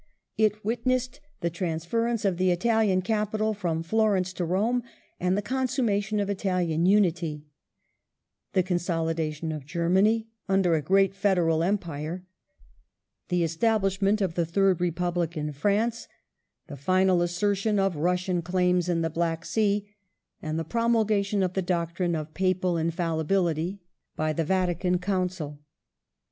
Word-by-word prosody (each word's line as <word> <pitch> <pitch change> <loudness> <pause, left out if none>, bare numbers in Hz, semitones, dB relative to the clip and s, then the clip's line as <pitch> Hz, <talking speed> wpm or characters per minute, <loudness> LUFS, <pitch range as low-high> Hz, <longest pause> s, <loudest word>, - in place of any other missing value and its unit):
It 215 -1 +1
witnessed 255 +4 -1 0.2
the 170 - -1
transference 185 +7 -1
of 190 -3 +1
the 185 0 +2
Italian 195 0 +2
capital 215 +1 0
from 170 -5 -2
Florence 195 -1 +1
to 180 - -3
Rome 215 +8 +1 0.4
and 180 +2 +1
the 205 - -1
consummation 235 -5 0
of 200 - 0
Italian 180 -4 0
Unity; 170 -6 +2 1.1
the 185 - +3
consolidation 165 -3 -1
of 155 -3 -5
Germany 190 +7 +2 0.2
under 190 -3 +3
a 160 - +2
great 195 +5 +3
Federal 175 -5 +2
Empire; 170 -2 -2 1.0
the 180 -2 +1
establishment 195 +3 +1
of 185 -4 0
the 170 - +1
Third 185 +1 +2
Republic 175 -1 -1
in 150 0 -2
France; 210 +10 0 0.6
^ - - -56
the 150 - -8
final 185 +5 +2
assertion 200 +4 0
of 195 -3 +1
Russian 180 +3 0
claims 180 0 +1
in 170 -1 +1
the 165 - 0
Black 165 0 -1
Sea, 205 -2 +1 0.5
and 155 0 -3
the 165 - -1
promulgation 215 -1 +1
of 185 -1 -1
the 190 - 0
doctrine 175 -1 -1
of 155 0 -5
Papal 185 -1 +1
Infallibility 170 +2 -1 0.3
by 155 0 0
the 165 - 0
Vatican 180 0 +1
Council. 180 -5 -2
185 Hz, 135 wpm, -27 LUFS, 170-205 Hz, 1.1 s, the